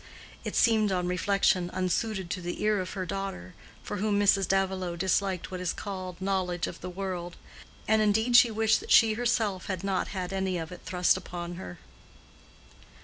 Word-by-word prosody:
It - - -4
seemed, 220 -3 +3
on 180 -1 0
reflection, 180 -1 +1
unsuited 185 +1 -1
to 185 - -3
the 175 0 -4
ear 210 -1 +2
of 185 0 -4
her 185 -2 -3
daughter, 195 - -5 0.3
for 205 - -4
whom 205 0 +1
Mrs. 195 -1 +3
Davilow 190 -2 0
disliked 190 +1 0
what 185 - -4
is 180 -1 -1
called 185 -3 -6
knowledge 185 -3 -1
of - - -8
the 180 - -5
world; 180 -2 -5 0.5
and 220 0 +4
indeed 220 +3 +2
she 240 -1 +8
wished 220 0 +2
that - - -11
she 225 -1 +6
herself 220 -4 0
had 190 -2 -3
not 195 -1 0
had 185 -1 -4
any 190 -1 -1
of 165 0 -5
it 180 - -9
thrust 180 0 +2
upon 175 -1 -6
her. 90 - -8
190 Hz, 180 wpm, -28 LUFS, 180-205 Hz, 0.5 s, she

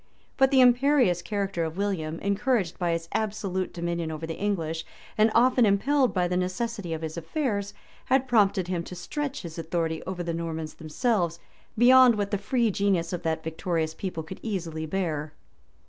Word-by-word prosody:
But 270 0 +4
the 265 -1 +5
imperious 250 - +4
character 195 -3 -2
of 160 +1 -4
William, 175 -6 -2
encouraged 200 -2 0
by 175 -2 +1
his 165 0 -3
absolute 200 -4 -2
dominion 170 -1 -3
over 160 0 -5
the 165 - -4
English, 165 -6 -2 0.3
and 215 +1 +4
often 250 +1 +5
impelled 250 +6 +3
by 180 -2 +1
the 180 - -1
necessity 185 +1 -2
of 160 0 -3
his 160 +1 -5
affairs, 205 - -2 0.3
had 265 0 +2
prompted 200 -6 +3
him 175 -2 -2
to 180 - -8
stretch 290 - -4
his 165 -1 -7
authority 165 -1 -2
over 185 -1 -3
the 170 -1 -2
Normans 160 -2 -4
themselves 170 +1 -1 0.4
beyond 250 0 +7
what 205 -1 -2
the 205 - 0
free 230 +1 +1
genius 190 -4 0
of 175 - -3
that 160 -1 -2
victorious 160 -1 -2
people 180 -2 -5
could 175 +4 -9
easily 165 -7 -4
bear. 155 -4 -2
185 Hz, 175 wpm, -27 LUFS, 165-220 Hz, 0.4 s, beyond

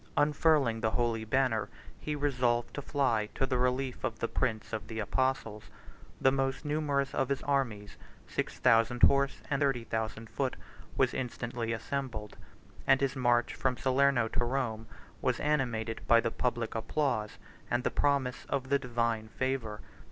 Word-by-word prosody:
Unfurling 145 -6 +3
the 110 - +2
holy 115 -1 0
banner, 115 -2 +1 0.3
he 150 - -3
resolved 125 -5 0
to 145 - -4
fly 120 -7 +1
to 135 - +1
the 130 -1 0
relief 125 +1 0
of 110 - -2
the 115 - -1
prince 115 -4 -2
of 110 - -3
the 110 - -6
apostles: 110 -1 -1 0.5
the 130 - +4
most 135 +1 -1
numerous 145 -2 0
of 135 - 0
his 140 -1 -1
armies, 120 -8 -1 0.3
six - - -3
thousand 120 0 +3
horse, 140 0 +4
and 140 +1 +1
thirty 135 -4 +1
thousand 110 0 -3
foot, 130 +3 -2 0.4
was - - +3
instantly 120 -2 -3
assembled; 115 -2 -4 0.5
and 135 0 +6
his 140 0 0
march 120 -2 +2
from 130 -2 0
Salerno 135 -2 +3
to 120 - 0
Rome 120 -3 -2 0.3
was - - +1
animated 120 -7 0
by 115 - +7
the 115 0 0
public 120 -2 -1
applause 115 -2 -1 0.3
and 120 +1 0
the - - 0
promise 140 -3 +1
of 130 -1 -2
the 140 0 +3
divine 115 -3 -1
favor. 115 -2 -2
125 Hz, 160 wpm, -31 LUFS, 115-135 Hz, 0.5 s, by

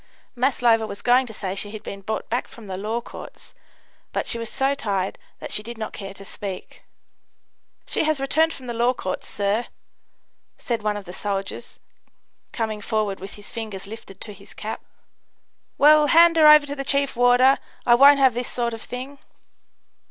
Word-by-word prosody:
Maslova 240 -3 +2
was 200 - -9
going 250 +1 +4
to - - -7
say 195 -3 -4
she 200 +1 -1
had 215 0 -9
been 195 - -7
brought 220 +3 -4
back 240 +2 -2
from 230 - -13
the 190 -2 -5
Law 215 +5 -3
Courts, - - -11 0.6
but - - -2
she 235 - +1
was 230 -1 -5
so 270 +1 +1
tired 200 -8 -2 0.2
that - - -7
she - - +2
did 235 +2 -8
not 220 -1 -5
care 195 -1 -8
to 195 - -10
speak. 195 -1 -7 1.0
"She - - -1
has 310 -2 +1
returned 315 +4 +2
from 265 - -9
the 240 - -4
Law 240 +2 +1
Courts, 185 -5 -5
sir," 205 +4 -1 0.9
said 235 -3 -3
one 210 -1 -1
of 205 - -8
the 180 - -9
soldiers, 195 0 -5 0.7
coming 220 -2 -3
forward 210 -2 -1
with 195 +1 -8
his 205 0 -12
fingers 215 -5 -6
lifted 205 -2 -11
to 210 - -8
his 200 0 -15
cap. 215 +1 -6 0.9
"Well, 300 +1 +6
hand 335 +2 +6
her 315 -2 +6
over 300 -1 +8
to 285 0 -5
the 275 - -4
chief 280 0 0
warder. 245 +2 +5 0.3
I 240 - +6
won't 280 +4 +8
have 265 -3 +4
this 245 +1 -3
sort 235 -1 -2
of 225 - -7
thing." 260 +3 -7
230 Hz, 190 wpm, -23 LUFS, 205-265 Hz, 1.0 s, over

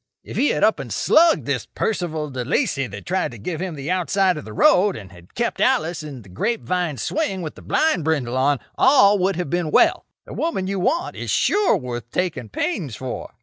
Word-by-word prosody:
If - - -9
he 290 - +2
had - - 0
up 215 +1 +3
and - - -7
slugged 330 0 +4
this - - -2
Percival 160 -8 -2
De 130 -1 -3
Lacey 140 - 0
that 100 -2 -9
tried 185 +1 0
to - - -9
give 160 - -5
him 185 -3 -4
the 145 +4 -4
outside 185 +1 +1
of 150 - -7
the 110 - -9
road, 185 - +4
and 100 -3 -10
had 85 -2 -17
kept 235 0 -1
Alice 175 -11 +1
in 140 -6 -9
the 100 - -16
grape 225 - -2
vine 175 -6 -1
swing 195 - -2
with 155 - -5
the - - -14
blind 310 - +1
bridle 140 -6 -1
on, 135 +1 +2 0.2
all 230 -7 +6
would 190 +1 +1
have 175 -4 -4
been 175 -2 0
well. - - +3 0.2
The - - -10
woman 320 - -2
you 195 0 -2
want 335 - 0
is - - -6
sure 405 - +3
worth 120 - -6
taking 150 -11 -2
pains 150 - -3
for. 130 +2 -6
175 Hz, 220 wpm, -22 LUFS, 130-200 Hz, 0.2 s, all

